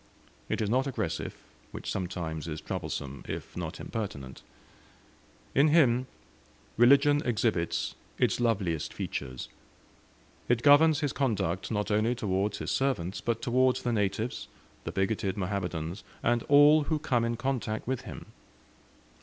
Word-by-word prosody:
It - - -1
is 105 - -1
not 130 +3 +2
aggressive, 135 - -3 0.3
which - - -6
sometimes 85 -5 -4
is 80 -1 -4
troublesome, 70 -2 -5
if - - -6
not - - -5
impertinent. 70 - -5 1.1
In 140 +3 +5
him, 130 -6 +4 0.7
religion 140 +5 +5
exhibits 110 -7 0 0.2
its - - +1
loveliest 95 -10 0
features; 65 -1 -4 1.0
it 120 -1 +2
governs 150 +1 +6
his 145 -3 -1
conduct 100 -9 -1
not 105 -1 -1
only 110 +4 +2
towards 100 -2 -1
his - - -3
servants, 120 -9 -1
but 115 -1 -2
towards 130 +1 +2
the 120 - 0
natives, 110 +3 -1 0.4
the - - -3
bigoted 95 0 -1
Mohammedans, 90 -2 -3 0.2
and 120 0 +2
all 145 +1 +7
who 155 - 0
come 125 -5 0
in 115 0 -1
contact 125 -4 -2
with 130 0 -2
him. - - -9
115 Hz, 130 wpm, -29 LUFS, 95-130 Hz, 1.1 s, all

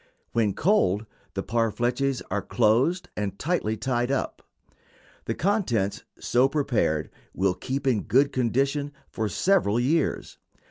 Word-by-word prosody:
When 110 -4 +1
cold, 115 - +2 0.3
the 95 - -2
parfleches 120 +4 0
are 100 +1 0
closed 120 - +2
and 100 -2 -3
tightly 135 - -1
tied 120 +1 -1
up. 135 - -2 0.8
The - - -2
contents 145 - 0 0.2
so 125 +2 +3
prepared 120 - 0 0.2
will 95 -1 +2
keep 130 +9 -4
in 120 -6 +2
good 140 +3 +3
condition 135 +4 0 0.2
for 110 -2 -2
several 145 - +2
years. 150 +6 0
120 Hz, 125 wpm, -26 LUFS, 105-140 Hz, 0.8 s, so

